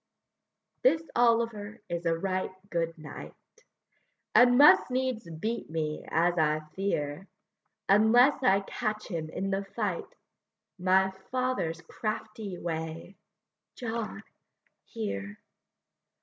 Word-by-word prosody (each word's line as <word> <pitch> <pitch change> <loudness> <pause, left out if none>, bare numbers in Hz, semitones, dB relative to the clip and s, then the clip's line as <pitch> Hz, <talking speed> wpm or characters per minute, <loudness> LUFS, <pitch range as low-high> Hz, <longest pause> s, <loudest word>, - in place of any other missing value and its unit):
This 325 -10 +4
Oliver 230 -3 +1
is 170 0 -3
a 165 0 +2
right 185 +1 -1 0.2
good 165 -1 -1
knight, 155 -1 -9 1.0
And 245 0 +7
must 290 -1 +7
needs 255 -7 -2
beat 215 +9 -4
me, 155 -1 -3
as 175 +1 +2
I 155 0 +2
fear, 185 -3 -2 0.6
Unless 230 +8 +5
I 200 -6 +4
catch 215 +2 -3
him 165 -4 -4
in 195 +4 -3
the 195 +1 0
fight, 200 -2 -4 0.6
My 190 +1 +3 0.2
father's 255 -11 -1
crafty 215 +1 -5
way: 165 +2 -5 0.6
John, 230 -2 -4 0.6
here! 100 - -5
195 Hz, 105 wpm, -29 LUFS, 165-230 Hz, 1.0 s, And